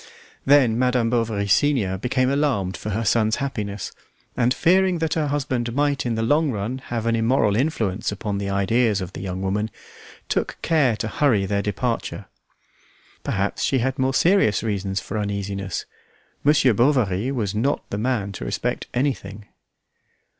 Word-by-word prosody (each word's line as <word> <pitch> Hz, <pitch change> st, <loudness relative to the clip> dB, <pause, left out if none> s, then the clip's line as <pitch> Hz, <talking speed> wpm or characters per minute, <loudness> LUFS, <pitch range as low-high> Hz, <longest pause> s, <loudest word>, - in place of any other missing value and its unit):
Then 130 Hz, -5 st, +5 dB
Madame 125 Hz, -2 st, +2 dB
Bovary, 115 Hz, -4 st, 0 dB
senior, 110 Hz, -4 st, +2 dB
became 130 Hz, +5 st, 0 dB
alarmed 135 Hz, -10 st, 0 dB
for 105 Hz, -, -6 dB
her 110 Hz, +3 st, -2 dB
son's 110 Hz, +1 st, +2 dB
happiness, 105 Hz, -8 st, -4 dB, 0.4 s
and 125 Hz, 0 st, +2 dB
fearing 185 Hz, +5 st, +3 dB
that 160 Hz, -1 st, -1 dB
her 155 Hz, -2 st, 0 dB
husband 130 Hz, -5 st, -2 dB
might 145 Hz, -2 st, +1 dB
in 115 Hz, -, 0 dB
the 110 Hz, -, -1 dB
long 150 Hz, +6 st, +2 dB
run 115 Hz, +3 st, -3 dB
have 115 Hz, -2 st, -3 dB
an 115 Hz, 0 st, +2 dB
immoral 115 Hz, -2 st, +2 dB
influence 110 Hz, -8 st, 0 dB
upon 100 Hz, 0 st, -3 dB
the 100 Hz, 0 st, -3 dB
ideas 100 Hz, +2 st, +2 dB
of 95 Hz, -1 st, -6 dB
the -, -, -7 dB
young 95 Hz, -1 st, -4 dB
woman, 105 Hz, +3 st, -1 dB, 0.6 s
took -, -, -1 dB
care 150 Hz, -8 st, +3 dB
to 110 Hz, +1 st, -3 dB
hurry 110 Hz, -4 st, +2 dB
their 100 Hz, +1 st, 0 dB
departure. 115 Hz, +4 st, -3 dB, 1.0 s
Perhaps 95 Hz, +1 st, -1 dB
she 135 Hz, -, +2 dB
had 130 Hz, +3 st, -1 dB
more 130 Hz, 0 st, +1 dB
serious 170 Hz, -, +3 dB
reasons 100 Hz, -3 st, -2 dB
for 110 Hz, -, -4 dB
uneasiness. 100 Hz, -2 st, -3 dB, 0.6 s
Monsieur 140 Hz, -4 st, +4 dB
Bovary 120 Hz, -2 st, +2 dB
was 110 Hz, -7 st, -2 dB
not 120 Hz, +7 st, -1 dB
the 100 Hz, -, -2 dB
man 110 Hz, -4 st, -1 dB
to 95 Hz, -, -7 dB
respect -, -, -2 dB
anything. 110 Hz, -6 st, -2 dB
115 Hz, 160 wpm, -23 LUFS, 100-135 Hz, 1.0 s, Then